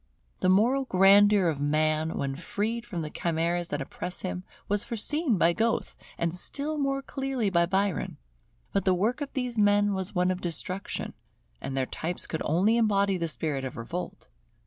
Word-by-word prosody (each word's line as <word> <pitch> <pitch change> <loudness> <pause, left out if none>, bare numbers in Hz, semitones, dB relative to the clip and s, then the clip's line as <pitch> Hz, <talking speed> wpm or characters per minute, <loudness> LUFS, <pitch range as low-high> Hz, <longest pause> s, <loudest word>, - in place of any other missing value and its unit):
The 185 - +2
moral 240 +8 +3
grandeur 200 -1 +6
of 150 -4 -1
man 155 +2 +1
when 135 -1 -2
freed 220 +8 -3
from 175 -8 -4
the 150 - -6
chimeras 170 +1 -1
that - - -3
oppress 180 - -6
him, 185 -1 -4 0.2
was 205 0 0
foreseen 250 - 0
by 170 0 +4
Goethe, 225 +4 0 0.2
and 170 -1 -1
still 290 +11 -2
more 275 -1 0
clearly 265 -7 -2
by 170 -1 +3
Byron. 190 -3 0 0.6
But 195 - +1
the 185 -1 +3
work 225 +10 0
of 285 - -4
these 250 -4 -2
men 205 0 +4
was 190 +1 -4
one 180 +1 +2
of 185 - -3
destruction; 180 +3 -3 0.5
and 135 - -4
their 130 - +1
types 170 +6 -3
could 160 - -4
only 195 +9 +3
embody 200 -3 +2
the 170 -1 -1
spirit 150 -3 -2
of 130 -1 -5
revolt. 165 +10 -6
190 Hz, 175 wpm, -28 LUFS, 170-220 Hz, 0.6 s, grandeur